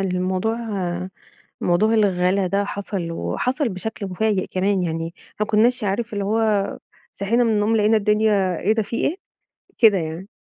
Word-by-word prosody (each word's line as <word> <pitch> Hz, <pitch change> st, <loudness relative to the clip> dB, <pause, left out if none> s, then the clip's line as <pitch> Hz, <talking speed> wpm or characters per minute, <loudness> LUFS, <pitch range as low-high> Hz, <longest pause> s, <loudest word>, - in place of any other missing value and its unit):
الموضوع 185 Hz, +4 st, -1 dB, 1.0 s
موضوع 210 Hz, +6 st, +2 dB
الغلا 190 Hz, -2 st, +2 dB
ده 200 Hz, +2 st, 0 dB
حصل 195 Hz, -4 st, -4 dB
وحصل 260 Hz, -, -1 dB
بشكل 205 Hz, +1 st, -5 dB
مفاجئ 195 Hz, +1 st, 0 dB
كمان 190 Hz, 0 st, 0 dB
يعني، 165 Hz, 0 st, -3 dB, 0.3 s
ما 210 Hz, -, +2 dB
كناش 230 Hz, +3 st, +2 dB
عارف 215 Hz, +4 st, -2 dB
اللي 200 Hz, -1 st, -2 dB
هو 215 Hz, -1 st, +1 dB, 0.3 s
صحينا 230 Hz, +5 st, +1 dB
من 230 Hz, -, +2 dB
النوم 215 Hz, +1 st, +2 dB
لقينا 215 Hz, +1 st, +4 dB
الدنيا 210 Hz, -3 st, +2 dB
إيه 215 Hz, -, +2 dB
ده 220 Hz, -1 st, +1 dB
في 230 Hz, -, -5 dB
إيه! 340 Hz, -, 0 dB, 0.6 s
كده 215 Hz, -5 st, +6 dB
يعني، 165 Hz, +3 st, -5 dB
205 Hz, 150 wpm, -22 LUFS, 185-220 Hz, 1.0 s, كده